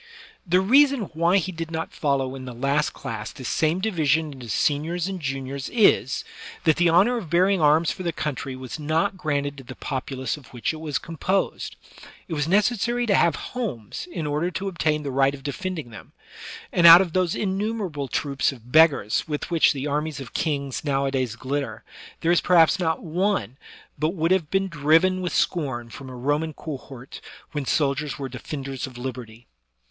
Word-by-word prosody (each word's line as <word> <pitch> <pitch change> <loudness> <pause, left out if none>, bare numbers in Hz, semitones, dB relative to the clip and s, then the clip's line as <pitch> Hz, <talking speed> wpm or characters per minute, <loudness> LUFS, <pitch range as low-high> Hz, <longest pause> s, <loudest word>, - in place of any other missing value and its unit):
The 180 +2 +4
reason 270 +5 +5
why 170 +4 +3
he 190 0 -1
did 165 -2 -5
not 160 0 -4
follow 135 -3 0
in 130 -1 -8
the 125 -2 -8
last 140 +4 +1
class 110 -2 -6
this 130 - -8
same 160 +3 +1
division 160 -6 +1
into 125 -4 -10
seniors 160 - 0
and 190 -1 -4
juniors 135 -1 -4
is, 225 -4 +3 0.4
that 160 -3 +3
the 175 -1 +4
honor 195 +9 +4
of 185 -9 -6
bearing 185 +2 +3
arms 155 +2 +4
for - - -7
their 175 -2 -1
country 140 -4 -4
was 130 +3 -7
not 160 +6 0
granted 145 -5 -2
to - - -10
the 120 - -10
populace 130 -1 -4
of 140 -5 -15
which 120 +5 -3
it - - -7
was 150 -3 -2
composed; 175 +4 -2 0.5
it 170 - -5
was 145 -1 -1
necessary 235 +5 +2
to 210 - +2
have 170 -3 +4 0.2
homes 215 - -4
in 160 - -4
order 150 +4 0
to 190 +2 -4
obtain 155 -4 0
the 140 - -3
right 135 +1 +2
of 135 - -14
defending 160 -3 -4
them; 105 - -12 0.6
and 170 -1 +6
out 170 +2 +11
of 175 -4 -3
those 180 -2 +1
innumerable 195 -7 -2
troops 140 +2 0
of 125 -2 -14
beggars 145 -9 +4
with 150 +2 -4
which 165 -2 +5
the 140 -1 -4
armies 150 0 -2
of 135 -2 -9
kings 140 -4 -2
nowadays 135 -4 0
glitter, 130 -2 -4 0.4
there 165 - +2
is 175 - +4
perhaps 170 -2 +5
not 160 -3 -1
one 170 - -1 0.4
but 155 +5 0
would 165 0 0
have 180 -6 +2
been 195 0 +1
driven 165 +3 +3
with 180 - -2
scorn 130 -9 -1
from 135 -2 -9
a 130 - -8
Roman 145 +5 -1
cohort 135 -4 -9 0.3
when 145 -3 -3
soldiers 140 -2 0
were 135 - -4
defend 135 +2 -6
ers 135 -1 -4
of 130 -2 -12
liberty. 120 -2 -7
155 Hz, 185 wpm, -24 LUFS, 135-175 Hz, 0.6 s, out